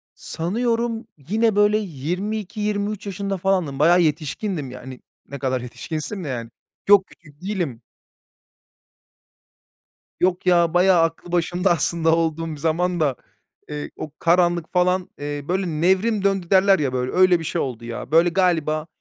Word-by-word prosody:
Sanıyorum, 230 Hz, +5 st, -2 dB
yine, 215 Hz, -, 0 dB
böyle, 205 Hz, +1 st, +4 dB
22-23 205 Hz, -, -3 dB
yaşında 195 Hz, 0 st, -3 dB
falandım, 180 Hz, -7 st, 0 dB
bayağı 175 Hz, +3 st, +5 dB
yetişkindim, 155 Hz, -, -2 dB
yani. 130 Hz, 0 st, -9 dB, 0.3 s
Ne 140 Hz, -1 st, -7 dB
kadar 130 Hz, -2 st, -1 dB
yetişkinsin 155 Hz, -, -5 dB
de, -, -, -6 dB
yani. 120 Hz, -4 st, -4 dB, 0.4 s
Yok, 200 Hz, -2 st, +6 dB
küçük 150 Hz, -2 st, -20 dB
değilim. 180 Hz, -, -3 dB, 2.4 s
Yok 180 Hz, 0 st, +1 dB
ya, 170 Hz, -2 st, +3 dB
bayağı 180 Hz, -1 st, +5 dB
aklı 165 Hz, +1 st, -3 dB
başında, 175 Hz, +2 st, +1 dB
aslında, 165 Hz, -1 st, +2 dB
olduğum 165 Hz, 0 st, -1 dB
bir 150 Hz, -, -6 dB
zamanda, 160 Hz, -2 st, 0 dB, 0.5 s
eee, 150 Hz, 0 st, -5 dB
o 155 Hz, -, -6 dB
karanlıki 175 Hz, -1 st, +2 dB
falan, 180 Hz, 0 st, +1 dB
eee, 145 Hz, 0 st, -4 dB
böyle, 185 Hz, +1 st, 0 dB
nevrim 190 Hz, +6 st, +1 dB
döndü 195 Hz, -3 st, 0 dB
derler 195 Hz, -2 st, +5 dB
ya 135 Hz, -3 st, -1 dB
böyle, 125 Hz, 0 st, -1 dB
öyle 185 Hz, -1 st, +4 dB
bir 165 Hz, -, -6 dB
şey -, -, -2 dB
oldu 120 Hz, -3 st, -5 dB
ya. 120 Hz, +3 st, -7 dB
Böyle, 165 Hz, +2 st, +5 dB
galiba, 165 Hz, -4 st, +1 dB
175 Hz, 140 wpm, -22 LUFS, 150-195 Hz, 2.4 s, Yok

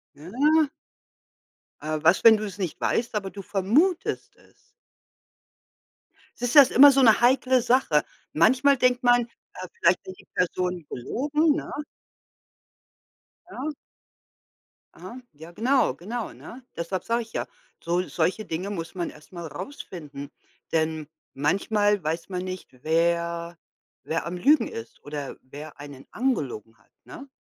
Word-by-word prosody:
Ja. 285 Hz, -, +2 dB, 1.1 s
Aber 155 Hz, 0 st, -3 dB
was, 170 Hz, +7 st, +4 dB
wenn 225 Hz, -1 st, +9 dB
du's 210 Hz, -3 st, -6 dB
nicht 185 Hz, -5 st, -4 dB
weißt, 230 Hz, -1 st, -1 dB
aber 195 Hz, -2 st, -2 dB
du 200 Hz, 0 st, -9 dB
vermutest 245 Hz, -, 0 dB
es? -, -, -27 dB, 1.7 s
Siehst 245 Hz, 0 st, -1 dB
du, -, -, +8 dB
dass 270 Hz, -, +5 dB
ist -, -, -6 dB
immer 280 Hz, +1 st, +10 dB
so 275 Hz, -, +3 dB
eine 230 Hz, -3 st, +6 dB
heikle 255 Hz, +1 st, +4 dB
Sache. 240 Hz, -, +2 dB, 0.3 s
Manchmal 260 Hz, -, +4 dB
denkt 250 Hz, 0 st, +2 dB
man, 245 Hz, -1 st, +4 dB, 0.3 s
ja, 185 Hz, -, -7 dB
vielleicht 170 Hz, +2 st, +4 dB
hat 185 Hz, -, -7 dB
die -, -, -19 dB
Person 180 Hz, -2 st, -1 dB
gelogen, 295 Hz, -, 0 dB
ne? -, -, -5 dB, 1.8 s
Ja. 310 Hz, -3 st, -5 dB, 1.2 s
Aha. 255 Hz, +2 st, -10 dB
Ja, 160 Hz, +3 st, -13 dB
genau, 255 Hz, +8 st, +2 dB
genau, 225 Hz, +6 st, -5 dB
ne? 250 Hz, +2 st, -12 dB
Deshalb 175 Hz, +2 st, -3 dB
sage 235 Hz, +1 st, 0 dB
ich 225 Hz, -, -14 dB
ja, -, -, -3 dB, 0.4 s
sol 175 Hz, +2 st, -1 dB
solche 180 Hz, +6 st, -1 dB
Dinge 180 Hz, +5 st, -4 dB
muss 170 Hz, -3 st, -5 dB
man 175 Hz, -2 st, -3 dB
erst 155 Hz, +3 st, -18 dB
mal 170 Hz, -2 st, -7 dB
rausfinden, 150 Hz, -, -8 dB, 0.4 s
denn 160 Hz, -1 st, 0 dB, 0.3 s
manchmal 205 Hz, +7 st, +1 dB
weiß 160 Hz, +2 st, -3 dB
man 180 Hz, -1 st, -3 dB
nicht, 185 Hz, 0 st, -6 dB
wer 170 Hz, +1 st, 0 dB, 0.5 s
wer 165 Hz, +1 st, -2 dB
am 175 Hz, +1 st, -4 dB
Lügen 295 Hz, -, +4 dB
ist 115 Hz, 0 st, -9 dB
oder 145 Hz, -2 st, -6 dB
wer 145 Hz, +3 st, -11 dB
einen 145 Hz, -2 st, -11 dB
angelogen 135 Hz, -, -2 dB
hat, -, -, -31 dB
ne? 275 Hz, -, -11 dB
185 Hz, 140 wpm, -25 LUFS, 165-245 Hz, 1.8 s, immer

